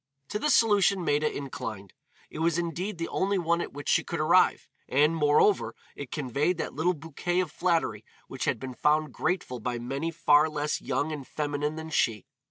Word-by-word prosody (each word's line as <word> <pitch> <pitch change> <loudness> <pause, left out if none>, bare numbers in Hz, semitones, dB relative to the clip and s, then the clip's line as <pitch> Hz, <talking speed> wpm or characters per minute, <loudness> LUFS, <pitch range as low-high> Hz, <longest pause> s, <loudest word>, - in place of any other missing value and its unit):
To 210 - -2
this 300 +5 +3
solution 200 -4 +3
Maida 150 +1 +1
inclined. 110 -8 -6 0.4
It - - -7
was 165 0 +1
indeed 175 +3 -3
the 165 - -3
only 195 +1 0
one 170 -1 +1
at - - -5
which 145 +1 -9
she - - +3
could - - -4
arrive, - - +3 0.2
and, 150 +4 +3
moreover, 150 +6 +3 0.2
it 140 -3 -7
conveyed 145 +5 0
that - - -4
little 175 +4 +1
bouquet 165 +4 -2
of 180 -5 -1
flattery 165 - 0 0.2
which - - -4
has - - +1
been 130 -1 -7
found 150 +1 +1
grateful 170 -9 -2
by 120 +2 -3
many 135 +7 -3
far 155 -2 +4
less 150 0 -2
young 155 +2 -1
and 145 -4 -6
feminine 150 0 -2
than 160 0 -7
she. 115 -5 +1
155 Hz, 185 wpm, -28 LUFS, 145-175 Hz, 0.4 s, far